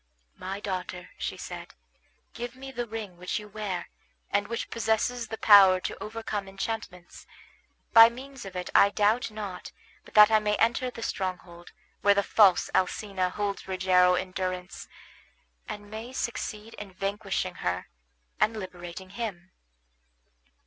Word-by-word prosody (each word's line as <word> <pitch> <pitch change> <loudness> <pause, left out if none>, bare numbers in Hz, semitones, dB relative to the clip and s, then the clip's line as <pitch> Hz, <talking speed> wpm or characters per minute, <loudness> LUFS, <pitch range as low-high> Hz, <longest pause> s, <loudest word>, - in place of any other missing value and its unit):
"My 195 +2 -4
daughter," 185 -2 -5
she - - -3
said, - - -8 0.6
"give 240 +1 -6
me 270 +1 -9
the 240 -2 -4
ring 210 -5 -6
which 180 +1 -3
you 210 - -7
wear, 205 -4 -4 0.4
and 205 0 +1
which 235 +1 -4
possesses 230 +1 0
the 220 0 -5
power 195 -4 +8
to - - -5
overcome 215 -2 -4
enchantments. 195 -2 -6 0.7
By 230 0 +10
means 265 +2 -10
of 195 -2 -9
it 180 0 -4
I 200 - +7
doubt 210 +4 +2
not 205 -4 -7 0.3
but - - -18
that 210 0 +9
I 215 - +6
may 210 0 0
enter 235 +3 +1
the 230 -2 -8
stronghold 180 -4 -5 0.3
where 200 0 +5
the 200 - +2
false 195 -4 +4
Alcina 190 0 0
holds 200 +1 -3
Rogero 185 -1 +4
in 185 +1 -3
durance, 185 0 -4 0.8
and 205 -1 -7
may 225 +4 -7
succeed 225 -3 -4
in 200 -2 -9
vanquishing 195 -1 -2
her 90 +1 -2 0.5
and 220 +1 +2
liberating 185 -1 -8
him." 195 -5 -5
205 Hz, 145 wpm, -28 LUFS, 185-225 Hz, 0.8 s, By